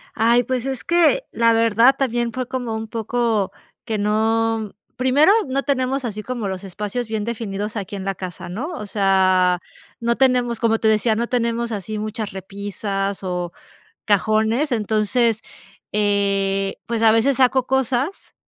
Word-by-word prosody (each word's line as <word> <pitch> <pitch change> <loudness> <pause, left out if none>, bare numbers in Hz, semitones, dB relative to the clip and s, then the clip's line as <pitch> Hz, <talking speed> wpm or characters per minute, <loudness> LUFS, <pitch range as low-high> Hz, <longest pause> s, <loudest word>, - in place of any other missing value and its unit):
Ay, 235 +2 +4
pues 255 0 -2
es 265 -1 -4
que 345 +9 +3
la 230 0 +3
verdad 230 +3 +4
también 240 -3 0
fue 255 +1 -4
como 245 -3 -3
un 220 0 -4
poco 225 -2 -1 0.3
que 220 -3 -2
no 220 +1 0 0.2
Primero, 270 +8 +4 0.2
no 275 +1 -1
tenemos 265 -1 0
así 215 -2 -4
como 240 -6 -3
los 190 +1 -5
espacios 210 +5 -4
bien 220 -1 -2
definidos 215 -2 -4
aquí 200 0 -5
en 190 - -5
la 195 -1 -2
casa, 180 -2 -7
¿no? 220 +11 -4
O 210 - -6
sea, 185 -3 +3 0.4
no 235 0 +1
tenemos 250 -3 +2
Como 225 -1 +2
te 220 - +1
decía, 215 +1 +2
no 235 +1 -1
tenemos 235 -1 -1
así 215 +1 -4
muchas 215 0 -4
repisas 195 +1 -4
o 180 -1 -3 0.5
cajones, 220 +7 +2
entonces, 220 +1 +1 0.5
eh, 200 -1 +1
pues 230 -1 -2
a 220 - +7
veces 235 +5 +3
saco 255 0 +3
cosas 265 - -1
225 Hz, 155 wpm, -21 LUFS, 205-245 Hz, 0.5 s, a